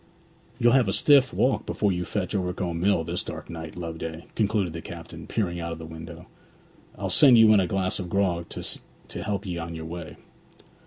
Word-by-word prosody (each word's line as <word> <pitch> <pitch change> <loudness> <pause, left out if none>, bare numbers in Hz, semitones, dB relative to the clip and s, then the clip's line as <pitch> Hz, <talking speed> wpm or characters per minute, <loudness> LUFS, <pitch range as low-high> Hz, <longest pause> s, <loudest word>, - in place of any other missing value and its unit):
'You'll 120 0 +4
have 130 -3 +4
a 95 - 0
stiff 140 -3 +5
walk 130 - +1
before 105 -2 +1
you 90 -1 -2
fetch 95 -2 -3
Overcombe 90 -3 -2
Mill 95 -2 +2
this 85 +2 -3
dark - - -7
night, 80 -2 -7
Loveday,' 80 -1 -6
concluded 100 -5 0
the 85 - -5
captain, 85 -1 -9
peering 85 -6 -1
out 85 0 -4
of - - -7
the 80 - -8
window. 80 0 -9 0.7
'I'll - - -3
send 135 -6 +7
you 110 -1 +8
in 105 - +6
a 95 - +1
glass 95 +1 -1
of 90 -2 -5
grog 90 -3 0
to - - -5
help 105 -1 -2
'ee 90 -2 -3
on 85 0 -5
your 80 0 -6
way.' 85 0 -7
90 Hz, 200 wpm, -26 LUFS, 85-100 Hz, 0.7 s, you